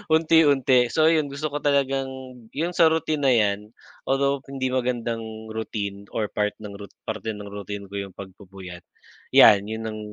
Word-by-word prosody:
unti-unti, 145 -5 +4
so 160 - +2
iyon 155 -3 +2
gusto 145 +3 -3
ko - - 0
talagang, 135 -1 +1 0.5
'yung 170 +3 0
sa 165 - +6
routine 155 -2 -1
na 135 - +4
iyan, 100 -1 +1 0.5
although 140 +1 +1
hindi 130 -1 -2
magandang 120 -3 -1 0.3
routine 100 -2 -5
or 105 -2 0
part 105 0 -1
ng 105 -1 -7
rout 100 - -11
parte 110 0 -4
ng 105 0 -8
routine 100 0 -6
ko 100 - -9
'yung 100 -2 -7
pagpupuyat, 95 -2 -11 0.5
iyan 100 0 +7
iyon 110 0 -4
ang, 110 0 -6
115 Hz, 165 wpm, -24 LUFS, 100-140 Hz, 0.5 s, iyan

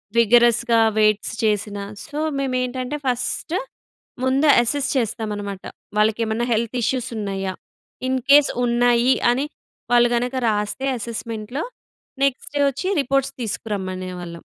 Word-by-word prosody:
విగరస్‌గా 235 0 +4 0.2
weights 215 -1 +2
చేసినా 205 -1 0 0.2
so, 295 +1 -8 0.2
మేమేంటంటే, 255 +1 -2
first 255 +7 -1 0.7
ముందు 270 +4 +2 0.2
అసెస్ 275 +4 -1
చేస్తామనమాట. 210 -5 -3 0.3
వాళ్ళకి 215 +1 +3
ఏమన్నా 220 +2 -1
హెల్త్ 230 +2 -1
ఇష్యూస్ 255 +2 0
ఉన్నాయా? 195 -2 -3 0.6
ఇన్‌కేస్ 275 +3 +4
ఉన్నాయి 240 +1 +3 0.2
అని 265 +4 0 0.5
వాళ్ళు 240 0 +6
గనక 245 +2 -1
రాస్తే, 210 +5 -2
అసెస్మెంట్‌లో 230 +3 -5 0.6
నెక్స్టు 275 +1 -1
వొచ్చి 275 +7 -2
రిపోర్ట్స్ 275 0 0
తీసుకురమ్మనేవాళ్ళం. 185 -5 -5
235 Hz, 105 wpm, -22 LUFS, 210-260 Hz, 0.7 s, వాళ్ళు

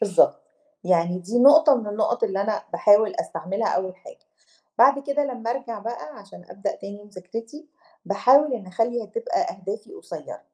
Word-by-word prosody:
بالضبط، - - +3 0.4
يعني 175 0 +1
دي 205 +7 -2
نقطة 290 +3 +7
من 230 - -5
النقط 210 +2 0
اللي 195 -3 -2
أنا 210 0 -2
باحاول 205 +1 +4
أستعملها 195 +4 -3
أول 185 0 -2
حاجة، 195 - -15 0.6
بعد 280 +1 +6
كده 285 +1 0
لما 245 -4 -4
أرجَع 240 -3 -4
بَقى 215 -7 -8
عشان 200 -3 -14
أبدأ 200 +1 -4
تاني 205 +1 -10
مذاكرتي، 225 - -9 0.4
باحاول 260 +7 +4
إني 200 -6 -7
أخَلّي 225 +5 -1
هتبقى 465 - -3
أهدافي 215 - -5
قصيرة، 405 - -9
220 Hz, 155 wpm, -23 LUFS, 200-265 Hz, 0.6 s, نقطة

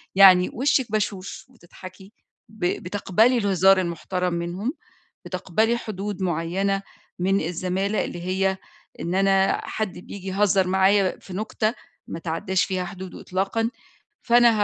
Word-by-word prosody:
يعني 185 -2 +8
وشِك 260 -2 +1
بشوش 205 -3 -3
وتضحكي، 190 -3 -13 0.4
ب 215 -4 -5 0.2
بتقبَلي 205 +6 +2
الهزار 195 -3 +4
المحترم 180 +1 -2
منهم، 175 - -3 0.5
بتقبَلي 190 +6 0
حدود 205 -2 -5
معينة 185 +3 0 0.4
من 195 +2 +2
الزمالة 185 +5 -1
اللي 175 - -6
هي 190 +1 0 0.4
إن 170 - -2
أنا 195 0 +3
حد 215 -4 -3
بييجي 190 +1 -8
يهزر 195 0 +2
معايا 190 +1 +3
في 190 - -12
نُكتة 215 +2 -1 0.3
ما - - -6
تعدّاش 175 +3 -1
فيها 185 -2 -2
حدوده 185 +1 -8
إطلاقًا، 195 +5 -1 0.5
فأنا 240 0 +6
190 Hz, 125 wpm, -24 LUFS, 180-205 Hz, 0.5 s, يعني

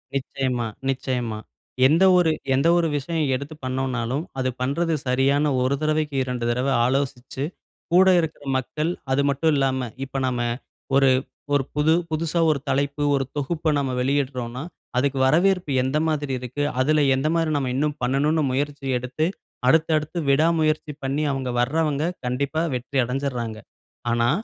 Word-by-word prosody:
நிச்சயமா, 130 -3 -1 0.2
நிச்சயமா. 125 -4 -2 0.5
எந்த 160 +6 +4
ஒரு 170 -3 +4 0.2
எந்த 140 +5 +2
ஒரு 170 -1 +2
விஷயம் 155 +2 -1
எடுத்து 140 +4 -6
பண்ணோம்னாலும், 130 +1 -1 0.2
அது 130 0 +1
பண்றது 165 +6 0
சரியான்னு 135 +4 +2
1 130 +2 +1
தடவைக்கு 155 -1 0
2 125 -2 -3
தடவ 125 +3 0 0.2
ஆலோசிச்சு, 135 0 -2 0.5
கூட 185 +2 +6
இருக்க 160 -2 -3 0.2
மக்கள். 150 +5 -2 0.2
அது 135 +2 +3
மட்டும் 140 +4 +2
இல்லாம, 130 -3 0 0.2
இப்ப 135 0 -4
நாம 125 -1 -1 0.6
ஒரு 135 -1 +5 0.4
ஒரு 140 -1 +3
புது 150 +2 +3 0.2
புதுசா 165 +2 -1
ஒரு 145 - 0
தலைப்பு, 140 +2 0
ஒரு 135 -1 0
தொகுப்ப 155 +3 -1
நம்ம 135 -2 -1
வெளியிட்றோம்னா, 130 -1 -1 0.3
அதுக்கு 135 +1 +1
வரவேற்பு 175 +3 +3
எந்த 130 +3 0
மாதிரி 145 -3 -1
இருக்கு, 125 +4 -4 0.2
அதுல 150 +3 +3
எந்த 135 +3 0
மாதிரி 165 -1 +1
நம்ம 135 -3 -1
இன்னும் 150 +2 0
பண்ணணும்னு 145 +5 +2
முயற்சி 140 +1 -2
எடுத்து, 125 +5 -2 0.4
அடுத்து, 160 +4 +4
அடுத்து 155 +3 -5
விடா 145 +4 +4
முயற்சி 155 -1 0
பண்ணி, 140 +3 -1
அவங்க 130 -2 -3
வர்றவங்க, 150 +3 +1 0.2
கண்டிப்பா 140 +6 -1
வெற்றி 125 +2 -2
அடைஞ்சிர்றாங்க! 125 -3 -3 0.6
ஆனா, 120 0 +2
140 Hz, 145 wpm, -23 LUFS, 130-155 Hz, 0.6 s, கூட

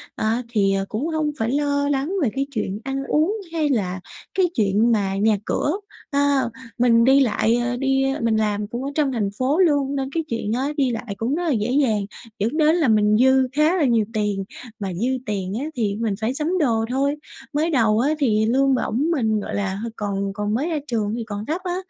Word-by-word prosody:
á 225 +3 0
thì, 200 -4 +2
à, 195 0 0
cũng 230 +9 -2
hông 315 -2 -1
phải 225 +1 0
lo 285 0 +1
lắng 285 +5 -1
về 250 - +2
cái 275 +1 -1
chuyện 210 -5 -3
ăn 270 +1 -3
uống 320 +8 +2 0.2
hay 310 -3 +1
là 190 -8 -1 0.3
cái 380 - +3
chuyện 215 +2 +2
mà 195 -3 +1
nhà 210 +1 +2
cửa, 295 - 0 0.4
a, 280 -1 +2 0.4
mình 230 -1 +4
đi 270 +2 +5
lại, 230 -3 +2
à, 245 0 -1
đi 270 0 +2
ơ, - - -5
mình 225 -1 +2
làm 210 -1 0
cũng 240 +4 -5
ở 275 - -2
trong 295 -3 +1
thành 215 -5 -1
phố 275 +7 +1
luôn 285 -5 +2
nên 270 -1 -2
cái 325 +2 -1
chuyện 225 -2 -2
á, 260 +3 0
đi 265 -3 +2
lại 230 -2 -4
cũng 240 +7 -1
rất 350 - -2
là 330 - +1
dễ 230 -1 0
dàng, 230 -8 +2 0.3
dẫn 230 +9 -1
đến 310 0 +4
là 325 -6 +2
mình 210 -1 +4
dư 260 +2 +4
khá 305 +4 +3
là 325 - +2
nhiều 230 -4 +2
tiền, 210 -3 -1 0.4
mà 195 -3 -3
dư 215 +8 -1 0.2
tiền 195 -3 -3
á 285 - -3
thì 210 -5 0
mình 225 -3 0
phải 225 +4 0
sắm 315 +6 -1
đồ 225 -6 +2
thôi. 275 +3 +1 0.4
Mới 305 +3 +1
đầu 225 -7 +3
á 275 +5 +2
thì 220 -6 +2
lương 265 +3 +3
bổng 265 +6 0
mình, 220 -9 +1
gọi 205 - -5
là, 195 -2 -1
hơi 225 +3 -5
còn 200 -2 -2
còn 205 +1 -2
mới 280 +9 0
ra 320 -3 -1
trường 220 -4 -1
thì 235 - -3
còn 205 0 -5
thấp 325 +7 -2
á, 355 -2 -2
240 Hz, 230 wpm, -22 LUFS, 215-285 Hz, 0.4 s, đi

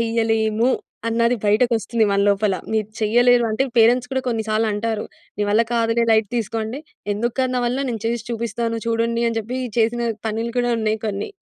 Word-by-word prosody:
చేయలేము? 225 0 +1 0.4
అన్నది 235 +1 +2
బయటకొస్తుంది 225 +1 +2
మన 200 - +2
లోపల. 200 -1 +2 0.2
మీరు 215 -2 0
చెయ్యలేరు. 240 +3 +4
అంటే 240 +5 +1
పేరెంట్స్ 245 +2 +4
కూడా 265 - 0
కొన్ని 225 -2 -1
సార్లంటారు. 215 0 0 0.3
"నీ 210 - +1
వల్ల 220 +3 +4
కాదులే 230 0 +2
లైట్ 220 -2 +3
తీసుకో" 225 -1 -2
అంటే 235 +6 -5 0.3
ఎందుకు 235 +3 -2
కాదు 255 -1 0
నా - - +1
వల్ల? 250 +3 -1
నేను 225 -3 -4
చేసి 235 -1 -2
చూపిస్తాను 230 0 -2
చూడండి, 230 0 0
అని 230 - -3
జెప్పి 245 +4 -5 0.2
చేసిన 235 +1 +1 0.2
పనులు 225 +2 -3
కూడా 245 0 +1
ఉన్నాయి 220 0 0
కొన్ని. 200 -1 -3
230 Hz, 175 wpm, -21 LUFS, 220-235 Hz, 0.4 s, చెయ్యలేరు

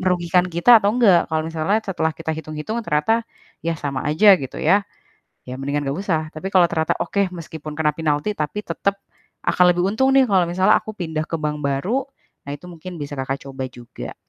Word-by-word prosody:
merugikan 180 -1 +2
kita 180 +7 +6
atau 205 +2 +2
nggak. 195 -9 +4
Kalau 155 0 +1
misalnya 165 +6 0
setelah 160 -5 -1
kita 160 -1 -4
hitung-hitung 155 +8 -5
ternyata 170 +9 +2 0.4
ya 165 - 0
sama 140 -2 -3
aja, 185 +8 +6
gitu 135 -2 -7
ya. 190 +6 +4 0.7
Ya 125 - -5
mendingan 140 +1 -2
nggak 140 +3 -2
usah. 170 -6 0
Tapi 170 +5 -5
kalau 180 -2 +6
ternyata, 160 -2 0
"Oke, 200 -1 0
meskipun 160 -3 -8
kena 150 -1 +1
pinalti 155 +5 0
tapi 155 +7 -2
tetep, 200 +4 -1 0.5
akan 180 - +4
lebih 175 0 0
untung 245 +7 +2
nih 270 -1 +6
kalau 185 -3 +4
misalnya 185 +4 +4
aku 215 - -8
pindah 160 -3 -3
ke 165 - -1
bank 150 -1 -2
baru." 180 - 0 0.4
Nah - - -4
itu 160 - -15
mungkin 175 +1 -9
bisa 145 0 -6
Kakak 135 +1 -3
coba 135 -1 -5
juga. 120 -1 -9
165 Hz, 195 wpm, -21 LUFS, 150-195 Hz, 0.7 s, kita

